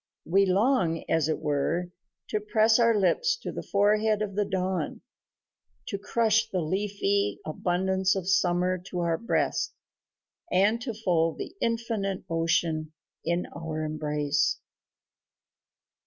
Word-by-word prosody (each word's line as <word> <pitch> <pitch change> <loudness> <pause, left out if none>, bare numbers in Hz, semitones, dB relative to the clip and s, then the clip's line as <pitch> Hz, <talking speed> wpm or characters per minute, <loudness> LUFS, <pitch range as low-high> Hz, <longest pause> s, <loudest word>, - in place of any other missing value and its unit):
We 195 +4 +3
long, 185 -4 +2
as 160 -1 +1
it 155 - +1
were, 160 +4 -1 0.4
to 215 - 0
press 215 +2 +3
our 230 -1 +4
lips 455 - +2
to 480 - -6
the - - -5
forehead 210 +1 +2
of 200 -2 -4
the 205 +1 0
dawn, 190 -1 -2 0.9
to 200 - -3
crush 225 +1 +2
the 185 - -1
leafy 155 - 0
abundance 190 +4 0
of 190 -2 -3
summer 185 -1 +2
to 180 - -3
our 170 -1 0
breast, 230 - 0 0.8
and 210 +5 +3
to 235 -3 -4
fold 170 -6 +1
the 350 - -7
infinite 225 -4 -1
ocean 165 -1 0 0.3
in 170 +2 0
our 155 -1 -4
embrace. 150 -1 0
190 Hz, 125 wpm, -27 LUFS, 165-210 Hz, 0.9 s, our